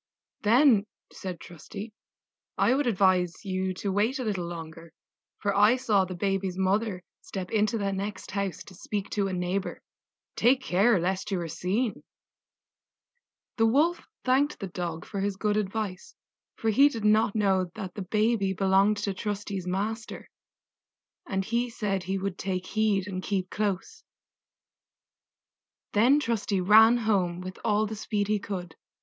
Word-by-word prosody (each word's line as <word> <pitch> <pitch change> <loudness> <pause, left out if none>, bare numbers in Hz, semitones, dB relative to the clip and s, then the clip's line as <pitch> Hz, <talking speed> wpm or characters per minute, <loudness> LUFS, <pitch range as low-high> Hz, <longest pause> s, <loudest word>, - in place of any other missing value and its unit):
"Then," 225 -1 +5 0.3
said 185 -3 -6
Trusty, 200 +6 -9 0.6
"I 250 - +4
would 275 0 +1
advise 185 -3 +2
you 190 -1 -1
to 195 +2 -3
wait 215 +8 +1
a 260 - -3
little 195 -6 -2
longer, 165 -1 -8 0.4
for 200 -1 -1
I 210 +4 +6
saw 215 -7 +2
the 185 - -6
baby's 195 0 -1
mother 190 0 0 0.2
step 185 -2 -6
into 215 +1 +2
the 200 -2 -1
next 200 +2 -5
house 200 -2 -3
to 195 - -14
speak 200 +2 -5
to 200 -2 0
a 190 - -3
neighbor: 180 +2 -2 0.6
take 255 +3 +4
care 195 +3 +3
lest 185 +4 -1
you 195 -3 -1
are 170 - -3
seen." 200 +8 -1 1.6
The 225 -1 +4
Wolf 305 +9 +2 0.2
thanked 270 +3 +2
the 195 - -4
Dog 175 -3 -5
for 200 - -5
his 200 0 -1
good 210 +1 0
advice, 205 -2 -3 0.4
for 225 - 0
he 275 +7 +6
did 225 -6 -5
not 215 0 +3
know 190 -4 +2
that 190 -4 -6
the 205 - -6
baby 210 0 +1
belonged 195 +2 +3
to 200 - -1
Trusty's 200 -1 -4
master; 215 +5 -4 1.0
and 190 -1 -1
he 235 +3 0
said 200 -4 -2
he 190 +2 -2
would 195 -1 -4
take 185 -1 -2
heed 215 -3 +1
and 185 -2 -4
keep 185 -2 -2
close. 205 -3 -2 1.9
Then 245 +8 +5
Trusty 225 -6 -1
ran 220 +5 +7
home 195 -6 0
with 185 +1 -7
all 215 -1 +2
the 215 +1 -5
speed 205 -1 -2
he 210 -1 +2
could. 180 -4 -6
200 Hz, 155 wpm, -27 LUFS, 185-220 Hz, 1.9 s, ran